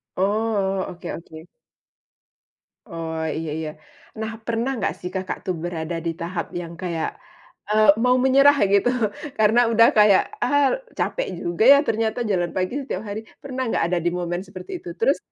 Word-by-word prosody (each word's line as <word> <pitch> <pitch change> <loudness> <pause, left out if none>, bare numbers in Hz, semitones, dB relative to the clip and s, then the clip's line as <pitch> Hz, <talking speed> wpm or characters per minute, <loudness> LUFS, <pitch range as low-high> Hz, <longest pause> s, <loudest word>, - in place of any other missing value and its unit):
Oh, 195 -1 0
oke 175 -1 -7
oke. 160 -1 -10 1.4
Oh, 165 -3 -5 0.2
iya 160 0 -4
iya. 160 -1 -3 0.5
Nah, 220 0 -3 0.2
pernah 235 +3 0
gak - - +1
sih, 180 - -5
Kakak, 190 0 -3
tuh 185 - -1
berada 170 -1 -3
di 165 - +1
tahap 170 0 -3 0.2
yang 170 -1 -8
kayak, 170 -3 -2 0.6
eee, 215 0 +4
mau 250 0 +4
menyerah 275 +2 +6 0.2
gitu. 200 +3 +4 0.5
Karena 220 +2 +4
udah 230 0 +6
kayak, 210 -2 +6 0.2
ah, 285 -1 +3 0.3
capek - - -1
juga 170 +4 -1
ya, - - +6
ternyata 220 +1 0
jalan 175 -3 0
pagi 185 +3 -1
setiap 260 -8 -4
hari, 205 +1 -4 0.2
pernah 260 -2 -3
gak - - +1
ada 180 - +2
di - - +4
momen 175 0 -2
seperti 185 - -10
itu? - - -9
Terus 460 - +3
195 Hz, 160 wpm, -23 LUFS, 175-225 Hz, 1.4 s, menyerah